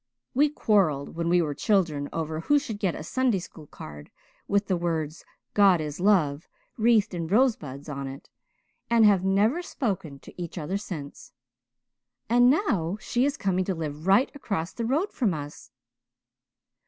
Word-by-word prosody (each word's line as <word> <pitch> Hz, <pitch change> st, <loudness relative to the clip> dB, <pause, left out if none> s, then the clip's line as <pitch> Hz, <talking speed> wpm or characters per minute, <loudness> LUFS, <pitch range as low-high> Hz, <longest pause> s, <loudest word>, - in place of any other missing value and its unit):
We 295 Hz, +3 st, +4 dB
quarrelled 190 Hz, -, +1 dB
when 170 Hz, 0 st, -1 dB
we 175 Hz, 0 st, +4 dB
were 150 Hz, -2 st, -2 dB
children 155 Hz, -5 st, 0 dB
over 160 Hz, -1 st, -3 dB
who 290 Hz, -, +3 dB
should 230 Hz, -8 st, -4 dB
get 190 Hz, -5 st, 0 dB
a -, -, -6 dB
Sunday 250 Hz, +4 st, +1 dB
school 165 Hz, -4 st, -10 dB
card 75 Hz, -, -11 dB, 0.4 s
with 200 Hz, +1 st, +1 dB
the 190 Hz, -, 0 dB
words 165 Hz, -2 st, -2 dB, 0.3 s
'God 195 Hz, -4 st, +5 dB
is 150 Hz, 0 st, -5 dB
Love,' 170 Hz, -7 st, +2 dB, 0.3 s
wreathed 220 Hz, -3 st, +3 dB
in 170 Hz, -2 st, -3 dB
rosebuds, 165 Hz, -, +1 dB
on 140 Hz, -2 st, -5 dB
it, 135 Hz, +1 st, -9 dB, 0.6 s
and 230 Hz, -2 st, +5 dB
have 200 Hz, -3 st, +4 dB
never 205 Hz, -, +2 dB
spoken 190 Hz, -, -3 dB
to -, -, -11 dB
each 170 Hz, 0 st, -6 dB
other 180 Hz, +5 st, -2 dB
since. 155 Hz, -8 st, -8 dB, 0.9 s
And 245 Hz, +2 st, +5 dB
now 205 Hz, -, +1 dB
she 245 Hz, +3 st, 0 dB
is 285 Hz, 0 st, -1 dB
coming 185 Hz, -2 st, 0 dB
to 190 Hz, -, -1 dB
live 155 Hz, 0 st, -5 dB
right 200 Hz, +7 st, +4 dB
across 195 Hz, -, -4 dB
the 230 Hz, -, -3 dB
road 310 Hz, -, 0 dB
from 210 Hz, -, 0 dB
us." 145 Hz, -1 st, -8 dB
185 Hz, 165 wpm, -26 LUFS, 155-225 Hz, 0.9 s, God